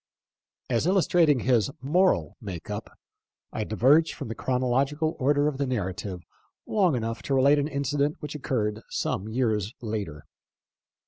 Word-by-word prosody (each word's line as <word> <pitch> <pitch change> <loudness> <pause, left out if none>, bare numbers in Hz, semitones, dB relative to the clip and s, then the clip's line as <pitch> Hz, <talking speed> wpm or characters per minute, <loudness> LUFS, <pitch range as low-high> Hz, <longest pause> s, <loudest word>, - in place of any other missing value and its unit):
As 120 +5 0
illustrating 175 -7 +3
his 120 -2 +2
moral 175 +8 +2
make 95 -3 -7
up, 105 +1 -6 0.6
I 110 - -2
diverge 135 +10 +3
from - - -6
the - - -2
chronological 135 +6 0
order 145 +2 +3
of 145 -2 -2
the 140 - 0
narrative 95 -5 -3 0.4
long 190 -8 +2
enough 115 -1 -3
to 135 - -1
relate 140 +2 +5
an 145 - 0
incident 145 0 0
which 150 -1 -6
occurred 110 -7 -2
some 105 +4 -2
years 110 -3 -1
later. 105 - -5
130 Hz, 140 wpm, -26 LUFS, 110-145 Hz, 0.6 s, relate